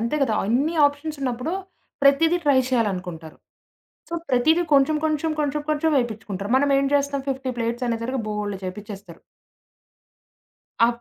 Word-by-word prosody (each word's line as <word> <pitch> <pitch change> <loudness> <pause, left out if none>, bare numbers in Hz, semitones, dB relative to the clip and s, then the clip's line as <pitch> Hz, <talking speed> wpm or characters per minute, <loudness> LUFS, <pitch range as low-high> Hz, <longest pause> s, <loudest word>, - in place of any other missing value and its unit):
అంతే 235 +5 -1
గదా! 225 -5 +1
అన్ని 275 +9 +1
ఆప్షన్స్ 290 +1 -4
ఉన్నప్పుడు 250 +5 -2 0.5
ప్రతీదీ 320 +5 +5
ట్రై 280 -3 +4
చేయాలనుకుంటారు. 180 -9 -2 0.7
సో, 340 - -4 0.2
ప్రతీదీ 315 +8 +3
కొంచెం 280 +3 +4
కొంచెం 315 0 0
కొంచెం 295 0 -1
కొంచెం 310 +1 +1
ఎపించుకుంటారు. 210 -3 -6
మనం 285 +1 +2
ఏం 275 - +1
జేస్తాం 280 -1 0
50 265 -1 -2
ప్లేట్స్ 235 +2 -2
అనేసరికి 235 +2 -2
బోలెడు 210 -2 -3
చేపించేస్తారు. 195 -2 -8 1.6
ఆ - - +6
260 Hz, 130 wpm, -23 LUFS, 215-290 Hz, 1.6 s, ఆ